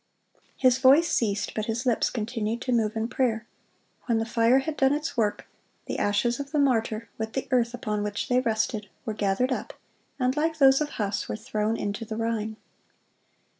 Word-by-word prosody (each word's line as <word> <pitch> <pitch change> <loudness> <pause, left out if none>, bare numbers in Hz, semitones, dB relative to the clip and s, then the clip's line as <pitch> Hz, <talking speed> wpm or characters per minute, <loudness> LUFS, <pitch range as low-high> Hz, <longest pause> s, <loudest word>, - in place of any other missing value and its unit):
(152) 260 - +6
His 250 0 +4
voice 280 +6 +5
ceased, 210 -3 0
but 215 - -2
his 235 +3 -2
lips 240 -3 +2
continued 225 0 -2
to 255 - -2
move 225 -3 +1
in 220 0 -1
prayer. 235 -4 0 0.6
When 235 -2 +2
the 225 - 0
fire 230 +2 +3
had 290 +3 -1
done 270 -1 +3
its 300 +2 -3
work, 215 -4 0 0.4
the - - -3
ashes 235 +4 +1
of 280 0 -6
the 305 - -1
martyr, 230 -5 +1
with 220 0 -3
the 265 - -3
earth 245 -1 +2
upon 210 -3 -2
which 205 0 -3
they 250 0 +3
rested, 220 -3 -1 0.2
were 220 - -2
gathered 210 +5 0
up, 255 - -3 0.5
and 255 +1 +1
like 315 +1 0
those 270 -1 +6
of 300 - -1
Huss, 200 -1 -2
were - - -2
thrown 215 -1 -2
into 205 +2 -3
the 220 0 -5
Rhine. 220 -1 -2
230 Hz, 195 wpm, -26 LUFS, 215-260 Hz, 0.6 s, 152